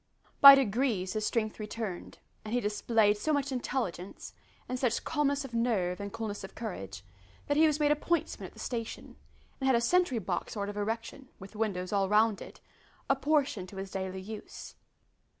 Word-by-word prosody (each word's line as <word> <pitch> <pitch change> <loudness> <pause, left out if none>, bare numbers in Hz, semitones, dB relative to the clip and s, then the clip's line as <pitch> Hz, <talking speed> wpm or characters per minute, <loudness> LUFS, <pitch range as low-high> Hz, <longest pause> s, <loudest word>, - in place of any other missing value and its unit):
By 275 0 +12
degrees 225 -6 0
his 215 -1 -1
strength 220 -2 -1
returned, 210 -3 -5 0.3
and 215 +2 -3
he - - +3
displayed 210 -1 +2
so 310 - 0
much 285 -2 0
intelligence, 240 -8 -4 0.3
and 255 0 -3
such 245 -3 0
calmness 285 -2 0
of 255 - -10
nerve 210 -7 0
and 200 0 -5
coolness 210 -2 -5
of 195 - -9
courage, 100 - -6 0.4
that 290 - 0
he 315 +2 +6
was 305 0 0
made 295 -1 +3
a - - +5
pointsman 340 +3 -2
at - - -17
the - - -20
station, 230 -2 -5 0.4
and 265 - -1
had 265 - +5
a - - +4
sentry 315 +2 +2
box 185 -5 -3
sort 205 -2 -3
of 205 - -6
erection, 225 +5 -4
with 195 +2 -12
windows 200 -4 -2
all 195 -1 +1
round 215 0 +3
it, - - -11 0.5
apportioned 275 -8 +1
to 195 - -11
his 195 0 -6
daily 190 0 -4
use. 215 +2 -9
225 Hz, 185 wpm, -30 LUFS, 200-265 Hz, 0.5 s, By